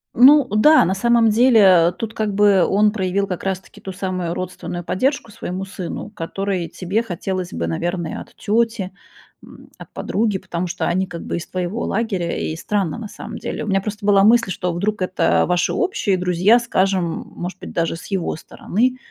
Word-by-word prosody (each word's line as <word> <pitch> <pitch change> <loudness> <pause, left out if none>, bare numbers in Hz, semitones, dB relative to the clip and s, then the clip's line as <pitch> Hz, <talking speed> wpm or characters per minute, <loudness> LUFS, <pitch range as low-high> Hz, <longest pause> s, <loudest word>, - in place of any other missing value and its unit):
Ну 280 +3 +7
да. 215 - +5
На 190 - 0
самом 235 +2 +3
деле 205 -7 +5
тут 225 -1 -5
как 215 -2 -2
бы 200 -2 +4
он 210 +2 +3
проявил 200 -1 -1
как 180 -2 -5
раз-таки 190 -1 -5
ту 190 - -7
самую 185 -3 -3
родственную 175 -1 -5
поддержку 230 - -1
своему 185 0 -5
сыну, 190 +1 -6
которой 195 -1 -3
тебе 195 +5 -2
хотелось 185 -2 -4
бы, 85 0 -2
наверное, 170 - -3
от - - -14
тёти, 220 -2 0 0.5
м, - - -15
от - - -12
подруги, 210 -2 -1
потому 180 -1 -4
что 180 +1 -3
они 190 +2 +1
как 170 -2 -7
бы - - -3
из 170 - -7
твоего 185 +4 -3
лагеря, 195 -6 -1
и 160 - -3
странно, 190 -2 -2
на 230 - -6
самом - - -8
деле. - - -5
У - - -6
меня 195 -1 +2
просто 210 0 -6
была 200 -1 +5
мысль, 230 -2 +4
что 180 -1 -2
вдруг 205 +4 -2
это 185 0 +2
ваши 180 0 +1
общие 230 - 0
друзья, 180 +6 +3
скажем, 195 -5 +1 0.3
может 180 +1 -6
быть, - - -8
даже 165 -1 -1
с 165 - -10
его 190 -6 -2
стороны. 245 +10 -1
195 Hz, 185 wpm, -20 LUFS, 180-215 Hz, 0.5 s, Ну